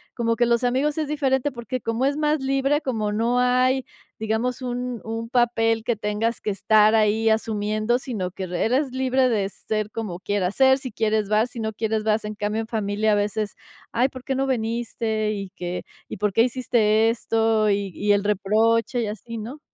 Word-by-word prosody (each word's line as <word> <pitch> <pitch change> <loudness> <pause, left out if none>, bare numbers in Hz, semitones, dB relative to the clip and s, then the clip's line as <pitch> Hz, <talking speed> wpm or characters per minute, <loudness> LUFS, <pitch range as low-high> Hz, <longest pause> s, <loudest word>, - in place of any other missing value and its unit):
como 230 -1 0
que 240 - +2
los 235 +1 +1
amigos 265 +4 +1
es 305 - -1
diferente, 280 -2 0
porque 250 0 -5
como 230 +3 -1
es 285 +1 +1
más 305 0 +1
libre, 275 +2 +1
como 220 -6 -2
no 230 +3 +1
hay, 255 +1 +3 0.4
digamos, 225 +4 -1
un 245 -1 -4
un 225 +1 -4
papel 225 -2 +1
que 235 -1 0
tengas 210 +2 -1
que 210 - -2
estar 215 +2 +4
ahí 220 +1 +3
asumiendo, 215 +1 0
sino 215 -9 -4
que 190 +1 -6
re 175 -1 -2
eres 260 +4 +1
libre 260 0 +2
de 205 -5 0
ser 215 +1 -3
como 210 -5 -5
quieras 195 -1 -1
ser, 265 -1 +5
si 260 -3 -6
quieres 215 -1 0
vas, 215 +3 +2
si 240 - -8
no 220 -1 -2
quieres 220 0 -1
vas, 215 0 +1
en 210 0 -5
cambio 210 +2 -2
en 220 - -7
familia 215 -1 0
a - - +4
veces: 205 0 -1 0.4
"Ay, 245 +3 +2
¿por 255 -1 -10
qué 270 - -2
no 270 +1 0
viniste? 225 -3 -1
¿Y 200 -2 -4
qué 180 0 -4 0.2
y - - -7
por 210 +1 0
qué 225 +4 +4
hiciste 225 -3 +2
esto?". 225 -2 +1
Y 200 -1 -1
y 205 0 +1
el 205 0 +3
reproche 220 +4 +1
y 220 - -1
así, 225 +2 -6
¿no? 245 +8 -7
225 Hz, 200 wpm, -23 LUFS, 210-250 Hz, 0.4 s, ser